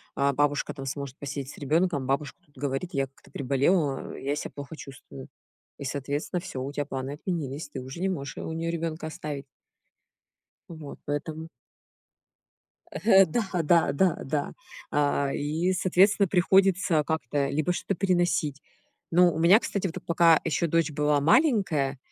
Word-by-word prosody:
а 140 0 +2
бабушка 145 +1 0
там 135 -2 -7
сможет 140 -1 -5
посидеть 140 0 -5
с - - -13
ребёнком, 150 -1 +1
бабушка 140 +2 -1
тут 145 -5 -29
говорит: 140 +5 -2
"Я 135 -1 +1
как-то 135 - -21
приболела". 140 +2 0
А: - - -9
"Я 140 +2 -2
себя - - -5
плохо 140 +2 -7
чувствую". 135 -2 -11 0.5
И, - - -7
соответственно, 145 +6 -3
всё, 130 -6 -6
у 140 - -4
тебя 145 -1 -2
планы 135 0 -4
отменились, 150 -2 -4
ты 135 - -6
уже 135 +6 -8
не 190 - +1
можешь 140 -7 -4
у - - -5
неё 165 +1 -2
ребёнка 165 -1 -3
оставить. 150 -4 -6 1.3
Вот, 155 -4 -9
поэтому 155 +2 -4 1.4
Э. 195 -3 +5
Да, 215 +6 -1 0.2
да 170 +2 +4
да 175 +3 +2
да. 145 +1 -2 0.4
А, 145 -1 +1
и, 160 +6 0
соответственно, 190 +2 +3
приходится 185 -3 +3
как-то 145 -2 -1
либо 155 +5 0
что-то 195 - -2
переносить. 175 -6 +1 0.5
Но 175 0 +5
у 160 - -4
меня, 180 +7 +7
кстати, 200 -5 -2
вот 165 - -6
эт - - -10
пока 165 -1 +5
еще 170 +1 0
дочь 165 -1 +1
была 150 0 +2
маленькая, 170 - +3
150 Hz, 160 wpm, -27 LUFS, 140-175 Hz, 1.4 s, меня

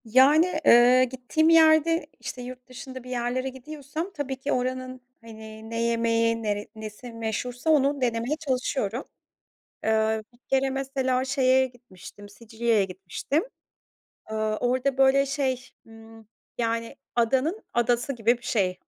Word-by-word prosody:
Yani, 290 +9 +4
eee, 245 +2 +7
gittiğim 260 +5 0
yerde, 325 0 +5
işte, 250 - -7
yurt 250 0 -9
dışında 255 0 -9
bir 250 - -11
yerlere 250 +1 -2
gidiyorsam 290 +5 -6
tabii 280 -4 -4
ki 280 +2 -3
oranın, 255 0 -2 0.2
hani, 220 -1 -11
ne 230 0 -2
yemeği, 230 0 +1
nere 205 -1 -2
nesi 220 +2 -9
meşhursa 235 +5 -3
onu 285 -2 +3
denemeye 240 +3 0
çalışıyorum. 255 -4 -2 0.8
Iıı, 220 0 +1
bir 240 - -24
kere 270 0 +2
mesela 265 -1 -1
şeye 260 -1 +3
gitmiştim, 205 -5 -14
Sicilya'ya 225 0 0
gitmiştim. 190 - -3 0.8
Aaa, 215 0 -2
orada, 255 +3 0
böyle, 270 +1 +5
şey, 265 -2 -2 0.2
ımm, 225 -1 -15 0.3
yani, 230 -1 -2 0.2
adanın 265 - +1
adası 240 +2 +1
gibi 235 -1 +1
bir - - -26
şey 190 -6 0
250 Hz, 130 wpm, -26 LUFS, 225-265 Hz, 0.8 s, eee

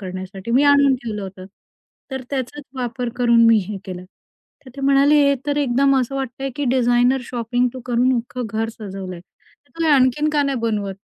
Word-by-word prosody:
करण्यासाठी 190 +2 -7
मी 255 +4 +4
आणून 280 -1 +5
ठेवलं 220 -5 -6
होतं. 190 -1 -9 0.7
तर 265 - -4
त्याचाच 275 +2 -4
वापर 245 0 -3
करून 235 -2 +4
मी 230 -1 +6
हे 210 - -4
केलं. 180 -1 -7 0.6
तर 255 - -12
ते 275 - -6
म्हणाले, 275 +2 +4
"हे 280 - +3
तर 290 0 0
एकदम 275 0 +2
असं 255 +2 -3
वाटतंय, 270 0 -4
की 290 - -2
डिझायनर 245 +1 +3
शॉपिंग 245 +1 -1
तू 255 - -7
करून 250 +1 +2
अख्खं 245 0 -4
घर 225 0 0
सजवलंय. 190 -4 -7 0.5
तू 330 -1 -3
आणखीन 275 +3 +2
का 295 -1 +2
नाही 275 -3 -1
बनवतं?" 205 -4 -2
245 Hz, 180 wpm, -20 LUFS, 225-275 Hz, 0.7 s, मी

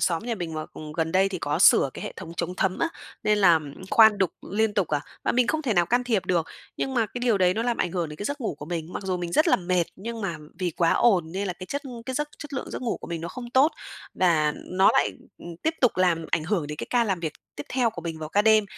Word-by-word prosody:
xóm 165 -2 +1
nhà 235 -1 -1
mình 170 -5 -5
mà, 155 0 -4
ừm, 150 -1 -8
gần 160 0 -1
đây 190 +1 +4
thì 185 -2 -4
có 145 -1 -1
sửa 135 - +6
cái - - -7
hệ - - -5
thống 170 -2 -8
chống 175 +1 -2
thấm 190 -1 0
á, 330 - +1 0.3
nên 210 0 +2
là 170 -5 +6 0.3
khoan 220 -2 +7
đục 190 -3 +2 0.2
liên 220 0 +1
tục 195 -5 +1
à, 150 -1 0 0.2
mà - - +2
mình 245 0 +3
không 315 -1 0
thể 235 -7 0
nào 175 -1 +3
can 245 +1 +1
thiệp 220 -6 0
được. 170 -3 +1 0.3
Nhưng 265 -1 -2
mà 230 -3 +2
cái 245 - -7
điều 235 -5 +2
đấy 180 -1 +3
nó 225 - -1
làm 240 -1 0
ảnh 175 - -1
hưởng 175 -4 -1
đến 150 - -8
cái 205 - -6
giấc 285 +2 -3
ngủ 220 - -2
của 145 0 -9
mình, 170 0 -4
mặc - - -5
dù 185 -1 -1
mình 175 -1 -4
rất 315 +2 +4
là - - +5
mệt, 180 -1 +1
nhưng 225 +4 -6
mà 170 -5 -2 0.2
vì 180 -2 0
quá 165 +1 +2
ồn 180 -8 +3
nên 195 +1 -2
là 180 - -2
cái 185 +1 -10
chất 285 +7 -3 0.2
cái 260 - -3
giấc 295 +1 -1
chất 295 -1 -9
lượng 270 - -4
giấc - - -5
ngủ 235 - -1
của - - -9
mình 170 -1 -4
nó 170 - -5
không 240 +2 -8
tốt, 270 +5 +4 0.4
và 155 -5 +3 0.2
nó 190 +2 +5
lại, - - +3 0.3
ừm, 170 -1 -9
tiếp 320 +1 +1
tục 250 - +4
làm 170 -3 +2
ảnh 155 - +1
hưởng 175 -5 0
đến 150 0 -6
cái - - -5
ca 240 -1 +3
làm 190 -5 -1
việc 160 -3 -3 0.2
tiếp 145 - -6
theo 245 -3 +2
của 175 -6 -8
mình 165 -2 -5
vào 155 -1 -6
ca 205 +5 +2
đêm, 215 -1 +5
185 Hz, 295 wpm, -25 LUFS, 170-230 Hz, 0.4 s, khoan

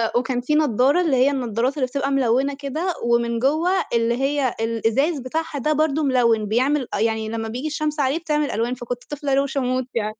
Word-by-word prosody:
وكان 245 0 0
في 300 +5 0
نضارة 285 +2 +3
اللي 315 -7 +2
هي 260 +3 +4
النضارات 250 +1 -1
اللي 260 - +1
بتبقى 275 +1 -2
ملونة 270 +1 +2
كده، 315 +6 -2
ومن 235 0 +1
جوّا 315 +4 +1
اللي 230 0 +2
هي 275 -2 0
الإزاز 230 +7 0
بتاعها 295 +3 -3
ده 305 +4 +1
برضه 310 0 +1
ملون، 235 -5 +2
بيعمل 260 +4 +1
أ - - -1
يعني 220 0 0
لما 225 0 -3
بييجي 250 +7 -4
الشمس 300 0 -2
عليه 280 +3 +1
بتعمل 300 -3 -1
ألوان، 230 +3 -1
فكنت 245 0 -6
طفلة 290 -1 -2
روشة 275 0 +1
موت 255 0 -1
يعني 215 -1 -2
265 Hz, 195 wpm, -22 LUFS, 235-295 Hz, -, هي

